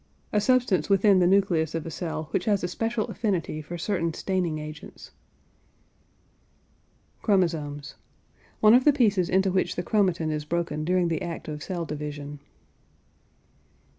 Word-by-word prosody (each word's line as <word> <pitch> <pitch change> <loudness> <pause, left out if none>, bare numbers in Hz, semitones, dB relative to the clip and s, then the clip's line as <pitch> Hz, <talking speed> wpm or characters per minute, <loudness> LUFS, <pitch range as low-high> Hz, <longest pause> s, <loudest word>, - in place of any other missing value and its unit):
A 210 - +3
substance 230 - +2
within 195 0 +5
the 175 - +4
nucleus 175 -5 +2
of 165 - -3
a 165 - -5
cell 160 -1 -4
which - - -1
has 205 -4 +1
a - - +1
special 225 +4 -2
affinity 185 -8 -2
for 170 +3 -7
certain 170 -2 -1
staining 180 -5 -1
agents. 150 0 -9 2.1
CHROMOSOMES. 160 -8 0 0.7
One 215 +1 +7
of 250 +1 +6
the 295 - +5
pieces 210 - +2
into 190 +1 +2
which 185 0 0
the 175 - -2
chromatin 180 -7 +1
is 150 -1 -2
broken 160 -1 -2
during 180 +1 +1
the 160 -2 -1
act 170 -1 -5
of 150 -1 -5
cell 175 0 -4
division. 145 -1 -6
175 Hz, 145 wpm, -26 LUFS, 155-200 Hz, 2.1 s, One